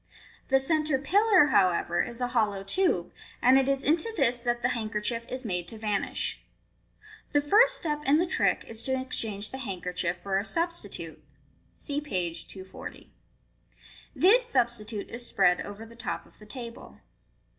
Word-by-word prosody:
The 270 - +4
centre 305 +1 +1
pillar, 380 +5 +4
however, 175 -2 +3
is 240 +1 -5
a 245 - 0
hollow 210 -5 0
tube, 360 - 0 0.3
and 260 +2 +6
it 270 0 +1
is 275 0 0
into 325 +9 +2
this 245 -4 +2
that 240 -1 -1
the 250 - +3
handkerchief 230 0 -2
is 255 0 -5
made 180 -4 -1
to 225 - -7
vanish. 210 -2 -2 0.9
The 290 - +5
first 450 +12 +5
step 300 -2 -3
in 285 +2 +5
the 345 - +2
trick 360 - +1
is 225 0 -7
to 260 +1 0
exchange 220 -5 -4
the 265 - -6
handkerchief 180 -5 -3
for 195 -1 0
a - - -2
substitute. 340 +8 -3 0.5
(See 290 -1 -3
page 175 - -3
240.) 190 -1 -9 1.0
This 450 +8 +6
substitute 235 - -1
is 240 +1 -3
spread 180 -4 +3
over 205 +2 -8
the 230 +1 -14
top 245 +1 -4
of - - -21
the 210 - -14
table. 235 +1 -9
240 Hz, 160 wpm, -28 LUFS, 205-290 Hz, 1.0 s, and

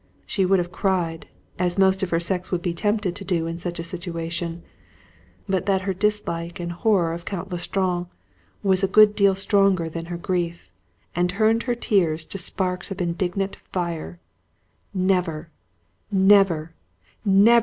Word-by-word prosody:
She 190 -3 +1
would 195 +1 +4
have 175 -1 -2
cried, 175 -4 -1 0.3
as 180 0 +1
most 190 0 +4
of 190 - -1
her 165 - +1
sex 180 +1 -1
would 180 -2 -1
be 175 - -1
tempted 205 0 0
to 200 - -6
do 175 -4 0
in 165 +1 -4
such 175 0 -4
a 170 - -4
situation, 170 -1 -4 0.8
but 190 0 -1
that 190 -1 +2
her 190 0 -1
dislike 185 -3 -1
and 175 0 -3
horror 175 -2 +1
of 170 0 -6
Count 190 0 -5
L'Estrange 180 0 -1 0.6
was 190 -2 +4
a 195 - +3
good 210 +1 +6
deal 200 -2 +4
stronger 195 -3 +2
than 165 +1 -6
her 175 0 -5
grief, 170 - -3 0.4
and 175 +1 +2
turned 220 +4 +2
her 240 - +2
tears 170 -9 +1
to 195 - -5
sparks 180 0 -1
of 195 0 -6
indignant 180 +2 -1
fire. 170 -1 -5 0.7
Never, 180 -4 0 0.6
never, 190 -5 +4 0.5
never! 210 +3 +6
180 Hz, 160 wpm, -23 LUFS, 170-195 Hz, 0.8 s, good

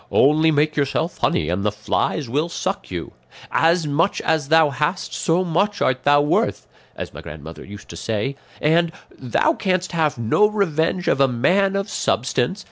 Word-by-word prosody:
'Only 155 +3 +4
make 155 0 +1
yourself 150 +4 -1
honey 75 - +1
and 90 +4 -1
the 105 - +1
flies 110 +7 -2
will 150 +8 -1
suck 190 +3 -4
you;' 85 -3 -6 0.4
'as 165 0 +3
much 160 +6 +1
as 160 -3 0
thou 160 -1 +4
hast 150 +7 -2
so 170 +2 +1
much 200 +5 0
art 130 0 0
thou 145 0 +5
worth,' 145 - 0 0.3
as - - -7
my - - -9
grandmother 80 +2 -9
used 105 +1 -11
to - - -8
say; 110 +5 -2 0.2
and 165 +2 +2 0.2
'thou 135 - +1
canst 185 - -1
have 160 -5 0
no 115 - +3
revenge 180 -4 0
of 135 - +2
a 135 - +6
man 185 +11 +2
of 195 +1 -1
substance. 130 - -1
155 Hz, 175 wpm, -21 LUFS, 130-175 Hz, 0.4 s, a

